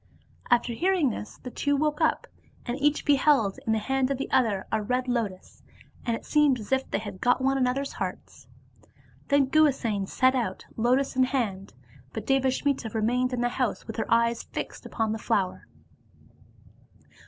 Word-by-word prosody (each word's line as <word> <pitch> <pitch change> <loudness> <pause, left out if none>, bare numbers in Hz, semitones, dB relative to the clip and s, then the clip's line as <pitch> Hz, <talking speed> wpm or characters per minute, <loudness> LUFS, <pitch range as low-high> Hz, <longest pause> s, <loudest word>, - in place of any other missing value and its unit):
After 240 -1 +2
hearing 345 -1 +2
this, 210 - -7
the 250 - -9
two 285 +3 0
woke 300 +2 0
up, 315 - +2 0.4
and 240 - -2
each 295 +1 +2
beheld 270 -7 +3
in - - +2
the 220 - +3
hand 265 +4 0
of 275 - -1
the 275 - -5
other 215 -7 +2
a 220 - +1
red 250 +4 -1
lotus, 225 -7 -3 0.5
and 230 - +1
it - - -9
seemed 295 -4 +3
as 210 +1 -10
if 265 0 +1
they - - 0
had 205 -2 -7
got 245 +1 +3
one 270 +1 +1
another's 270 +1 0
hearts. - - -6 0.8
Then 280 -1 +4
Guhasena 260 -9 +2
set 260 +5 +3
out, 230 -8 -2
lotus 255 +5 +1
in 260 0 +4
hand, 215 -8 -3 0.4
but - - -5
Devasmita 265 -2 +1
remained 245 +4 +1
in 250 -1 -2
the 245 - +1
house 245 -3 -2
with 225 - -7
her 225 - -3
eyes 235 0 +3
fixed - - -7
upon 220 -2 -1
her 220 - -3
flower. 190 -3 -1
250 Hz, 175 wpm, -27 LUFS, 225-270 Hz, 0.8 s, Then